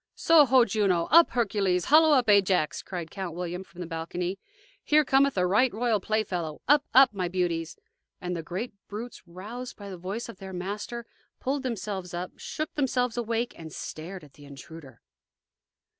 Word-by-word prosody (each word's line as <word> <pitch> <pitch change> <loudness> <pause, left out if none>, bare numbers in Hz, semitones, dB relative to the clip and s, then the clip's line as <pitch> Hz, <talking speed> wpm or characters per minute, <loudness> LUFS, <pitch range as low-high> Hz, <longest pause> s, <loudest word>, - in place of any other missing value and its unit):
"Soho, 265 -6 +5
Juno! 190 -5 +1
up, 335 +1 +7
Hercules; 200 -6 0
hollo, 310 +1 +6
up, 255 -4 +3
Ajax!" 190 -6 +3
cried 175 -4 -6
Count 185 -4 -5
William, 180 +1 -4
from 180 -1 -12
the - - -4
balcony. 175 +3 -4 0.4
"Here 300 0 +4
cometh 270 -2 +3
a 180 - +3
right 220 +8 +3
royal 225 0 0
playfellow 180 -7 -2
up, 290 +1 +5
up, 260 -3 +6
my 185 -3 -2
beauties!" 175 -2 -2 0.4
and 180 0 -4
the 165 - -3
great 185 +9 -5
brutes, 220 +3 -7
roused 215 +9 -8
by 200 -1 -9
the 185 - -7
voice 195 +6 -5
of 230 - -10
their 190 -1 -8
master, 205 +6 -5 0.3
pulled 275 +2 -1
themselves 200 -7 -4
up, 180 +1 -4
shook 310 0 -5
themselves 250 -4 0
awake, 235 0 -2
and 160 -1 -10
stared 170 +5 -7
at 145 -2 -16
the 145 +1 -15
intruder. 140 +1 -12
195 Hz, 170 wpm, -27 LUFS, 175-240 Hz, 0.4 s, up